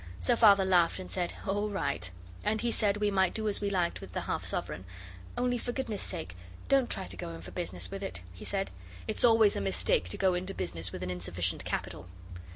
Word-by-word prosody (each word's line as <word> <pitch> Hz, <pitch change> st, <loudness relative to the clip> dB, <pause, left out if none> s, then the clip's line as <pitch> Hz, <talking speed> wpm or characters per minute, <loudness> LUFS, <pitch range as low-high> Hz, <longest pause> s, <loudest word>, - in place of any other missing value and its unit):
So 85 Hz, -, +3 dB
Father 200 Hz, -4 st, +7 dB
laughed 180 Hz, -3 st, +4 dB
and 185 Hz, -, -7 dB
said, 175 Hz, -2 st, -1 dB
'All 205 Hz, +2 st, 0 dB
right.' 145 Hz, -, 0 dB, 0.3 s
And 220 Hz, 0 st, +1 dB
he 240 Hz, 0 st, +1 dB
said 205 Hz, -2 st, +2 dB
we 210 Hz, 0 st, +1 dB
might 190 Hz, -2 st, +2 dB
do 220 Hz, -1 st, -1 dB
as 205 Hz, -, +1 dB
we 200 Hz, -, +1 dB
liked 180 Hz, -3 st, 0 dB
with -, -, -10 dB
the -, -, -1 dB
half -, -, -2 dB
sovereign. 90 Hz, -, -3 dB, 0.5 s
'Only 245 Hz, 0 st, +1 dB
for 245 Hz, -, -3 dB
goodness' 235 Hz, -5 st, -2 dB
sake 160 Hz, -, -4 dB, 0.3 s
don't 270 Hz, -3 st, +4 dB
try -, -, -2 dB
to 90 Hz, +2 st, -5 dB
go 85 Hz, -, -5 dB
in 80 Hz, -, -10 dB
for 90 Hz, -, -9 dB
business 90 Hz, -, -2 dB
with 195 Hz, 0 st, -5 dB
it,' 190 Hz, -, -4 dB
he 90 Hz, -, -10 dB
said. 195 Hz, -1 st, -2 dB, 0.4 s
'It's 215 Hz, -, -2 dB
always 225 Hz, -3 st, +6 dB
a -, -, -1 dB
mistake 90 Hz, -2 st, +1 dB
to -, -, -4 dB
go 190 Hz, -1 st, +3 dB
into 185 Hz, +2 st, -2 dB
business 85 Hz, +1 st, -2 dB
with 90 Hz, -, -5 dB
an 90 Hz, -, -2 dB
insufficient 90 Hz, 0 st, -1 dB
capital. -, -, -3 dB
190 Hz, 225 wpm, -31 LUFS, -, 0.5 s, Father